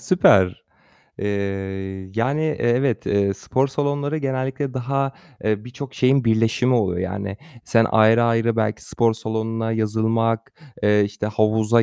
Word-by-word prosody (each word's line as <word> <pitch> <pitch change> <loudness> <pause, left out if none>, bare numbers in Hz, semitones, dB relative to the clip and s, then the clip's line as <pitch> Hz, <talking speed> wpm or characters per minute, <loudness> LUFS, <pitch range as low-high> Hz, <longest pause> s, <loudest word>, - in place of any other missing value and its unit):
Süper. 95 - +3 0.5
Eee, 100 - -3 0.9
yani, 130 +7 0
eee, 155 -1 0 0.2
evet, 125 -1 0
eee, 100 -1 +1
spor 130 +6 -1
salonları 145 +2 -1
genellikle 135 0 -3
daha, 135 +2 -1 0.3
eee, 105 -1 0
birçok 130 +2 -8
şeyin 130 +1 +3
birleşimi 115 +3 +2
oluyor 95 -7 +1
yani, 95 +1 -4 0.3
sen 115 -1 +3
ayrı 110 +1 +5
ayrı 115 0 +1
belki 110 -1 -1
spor 115 -2 +1
salonuna 110 0 -3
yazılmak, 115 +1 0 0.3
eee, 105 0 +4
işte, 105 +1 -4
havuza 110 +2 +2
115 Hz, 130 wpm, -22 LUFS, 110-130 Hz, 0.9 s, ayrı